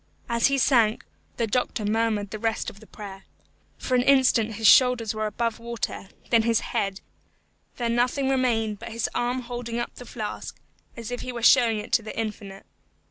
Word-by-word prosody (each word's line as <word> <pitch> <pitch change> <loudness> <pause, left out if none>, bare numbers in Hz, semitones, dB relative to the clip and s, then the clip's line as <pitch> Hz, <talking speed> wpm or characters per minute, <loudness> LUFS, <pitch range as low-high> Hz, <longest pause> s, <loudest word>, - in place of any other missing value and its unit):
As 235 -1 +2
he 275 0 +1
sank, 235 -5 +3 0.3
the 235 - +1
doctor 225 -1 -1
murmured 215 -1 0
the 215 - -5
rest 225 0 -1
of 200 - -17
the 220 - -16
prayer. 195 -2 -10 0.5
For 255 - -4
an 250 - +4
instant 250 -4 +3
his 225 +1 -4
shoulders 245 -1 +5
were 215 0 -2
above 230 +2 -2
water, 230 -4 -5 0.2
then 230 -1 +5
his 230 0 +1
head, 195 0 -2 0.7
then 235 -1 -1
nothing 250 +3 +1
remained 230 -6 +1
but - - -8
his 230 0 -2
arm 245 +1 -1
holding 240 -1 -5
up 240 - -3
the 245 - -11
flask, 215 -3 -6 0.4
as 230 0 -6
if 245 - -4
he 255 - -5
were 235 -2 -6
showing 235 -3 +5
it 210 +2 -7
to - - +4
the 215 - -8
Infinite. 205 -3 -6
230 Hz, 190 wpm, -25 LUFS, 215-245 Hz, 0.7 s, shoulders